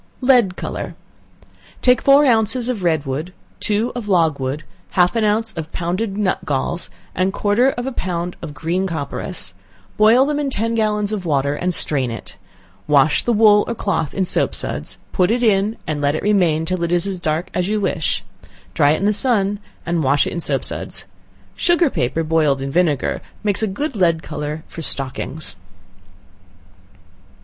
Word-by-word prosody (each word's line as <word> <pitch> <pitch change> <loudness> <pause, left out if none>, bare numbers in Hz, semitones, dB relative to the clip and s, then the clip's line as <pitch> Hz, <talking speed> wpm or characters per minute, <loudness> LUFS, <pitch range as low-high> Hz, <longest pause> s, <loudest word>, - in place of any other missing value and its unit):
Lead 245 -8 +4
Color. - - -5 0.9
Take 250 0 +4
four 280 +1 +6
ounces 235 0 +2
of 235 -6 -2
red 160 -4 +1
wood, 150 +7 -4 0.3
two 215 +3 0
of 240 -4 -5
logwood, 150 -5 +1 0.3
half 180 +4 +4
an 225 - +1
ounce 220 +1 +1
of 160 -1 -6
pounded 190 +4 -2
nut 195 -2 +1
galls, 150 +2 -2 0.2
and 185 +1 +1
quarter 210 +6 +2
of 245 -2 -4
a 270 - -2
pound 175 -6 -3
of 150 -3 -7
green 175 +5 -1
copperas; 160 - -4 0.4
boil 225 +5 +6
them 295 0 -1
in 285 -2 -1
ten 230 -2 -1
gallons 210 -2 0
of 210 -3 -3
water, 140 -2 +1
and 180 +4 -1
strain 135 -5 +2
it; 115 -1 -8 0.5
wash 150 0 +4
the 240 - +1
wool 210 -2 +6
or 235 - -2
cloth 195 -9 -2
in 190 - +1
soap - - +1
suds, - - -4
put 180 0 +2
it 240 +2 +1
in, 210 0 +2
and 150 -2 -2
let 145 +1 +1
it - - -3
remain 175 -6 +2
till 185 +1 -2
it 170 - -1
is 175 0 +2
as 195 -2 -3
dark 160 +1 -2
as 180 +1 -1
you 215 0 +1
wish 185 -5 -1 0.2
it; - - -21 0.2
dry 145 - +4
it - - 0
in 195 - -1
the 210 - +3
sun, 205 -4 +1 0.3
and 170 -1 0
wash 140 +1 +3
it - - -4
in 175 - -3
soap - - 0
suds. - - -4 0.5
Sugar 345 -4 +3
paper, 145 +7 -1
boiled 155 -3 +2
in 135 0 -4
vinegar, 155 -4 +1 0.2
makes 205 -1 0
a 220 - +1
good 270 +8 -3
lead 170 -4 +2
color 150 0 -5
for 165 - -8
stockings. 140 - -2
185 Hz, 180 wpm, -20 LUFS, 155-215 Hz, 0.9 s, four